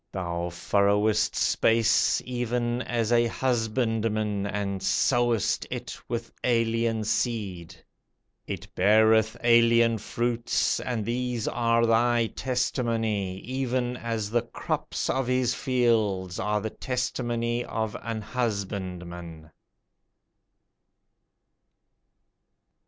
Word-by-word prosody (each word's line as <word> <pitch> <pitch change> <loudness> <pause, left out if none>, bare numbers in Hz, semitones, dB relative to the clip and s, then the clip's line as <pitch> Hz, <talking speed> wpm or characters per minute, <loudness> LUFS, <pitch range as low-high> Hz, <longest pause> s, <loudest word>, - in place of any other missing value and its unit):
Thou 85 -2 -3
furrowest 100 +4 +2
space, 115 -2 +3
Even 120 0 -1
as 120 -2 -1
an 120 0 +4
husbandman, 110 -4 0
And 100 -1 -3
sowest 120 -4 +1
it - - -5
with - - -4
alien 115 -2 +1
seed; 105 -7 -2 0.7
It - - -5
beareth 110 +2 +4
alien 115 -1 +5
fruits, 120 +2 0
And 115 -4 -3
these 120 -1 -2
are 115 0 +2
thy 115 +1 +3
testimony, 115 -6 -1
Even 125 -1 -2
as 115 -3 -3
the 120 0 +2
crops - - -3
of 135 -2 0
his 125 -1 +1
fields 110 -8 0
Are 105 +1 0
the 110 - -4
testimony 120 -2 -2
of 110 -2 -3
an 115 -2 -4
husbandman. 90 -8 -4
115 Hz, 90 wpm, -26 LUFS, 105-120 Hz, 0.7 s, alien